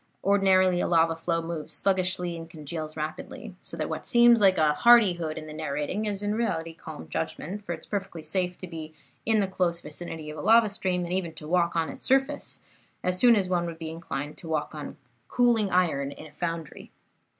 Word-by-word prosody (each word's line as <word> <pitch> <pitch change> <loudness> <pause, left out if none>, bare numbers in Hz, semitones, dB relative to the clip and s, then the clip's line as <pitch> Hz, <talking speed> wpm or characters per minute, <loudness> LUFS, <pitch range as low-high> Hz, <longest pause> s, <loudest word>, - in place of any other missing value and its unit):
Ordinarily 190 -2 +4
a - - 0
lava 165 -1 +3
flow 165 0 -1
moves 165 -2 -5
sluggishly 185 -2 +1
and 165 0 -8
congeals 155 0 -6
rapidly, 155 +1 -6
so - - -6
that - - -2
what - - -4
seems 240 -2 +6
like 190 -2 +5
hardihood 175 0 +4
in 155 - -6
the 155 - -8
narrating 155 +6 -2
is 205 -1 -2
in 205 0 0
reality 165 -8 -1
calm 160 -2 -10
judgment, 165 +5 -4
for 175 - -3
it 160 - -8
is - - -10
perfectly 195 -5 -4
safe 180 +3 -1
to - - -7
be 160 -2 -8 0.3
in 220 -2 +4
the 195 - +1
close 180 -3 0
vicinity 155 0 -7
of 155 - -8
a - - -4
lava 225 +1 +5
stream, 185 -3 -1
and 175 - -3
even 180 -3 -1
to 150 - -9
walk 170 0 +2
on 165 -1 +1
its - - -9
surface 270 +2 0 0.4
as 180 0 0
soon 240 +1 +7
as 195 -3 +1
one 175 -2 0
would 165 -1 -6
be 160 -1 -5
inclined 150 -3 -5
to 165 - -8
walk 155 -1 -1
on 150 -1 -7 0.3
cooling 235 - +3
iron 160 -7 +1
in - - -10
a 155 - -13
foundry. 165 0 -5
170 Hz, 205 wpm, -27 LUFS, 160-195 Hz, 0.4 s, soon